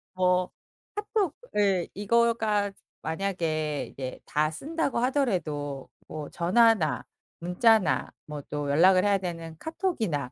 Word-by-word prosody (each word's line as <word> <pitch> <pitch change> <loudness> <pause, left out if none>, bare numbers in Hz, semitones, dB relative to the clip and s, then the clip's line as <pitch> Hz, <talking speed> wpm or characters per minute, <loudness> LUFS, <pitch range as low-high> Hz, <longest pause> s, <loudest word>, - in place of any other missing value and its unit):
뭐 180 0 +2 0.4
카톡 415 -5 -1 0.2
예, 195 -4 +2
이거가 215 -1 +2 0.3
만약에 160 -4 -1
이제 130 -1 -6
다 155 +1 +1
쓴다고 295 - -2
하더라도 170 - -1 0.2
뭐 150 -2 -6
전화나, 190 -1 +3 0.4
문자나, 180 +2 +3 0.2
뭐 150 -1 -6
또 145 -1 -3
연락을 185 +5 +5
해야 200 -1 +4
되는 165 -3 -5
카톡이나 220 - -2
185 Hz, 235 characters per minute, -27 LUFS, 155-225 Hz, 0.4 s, 연락을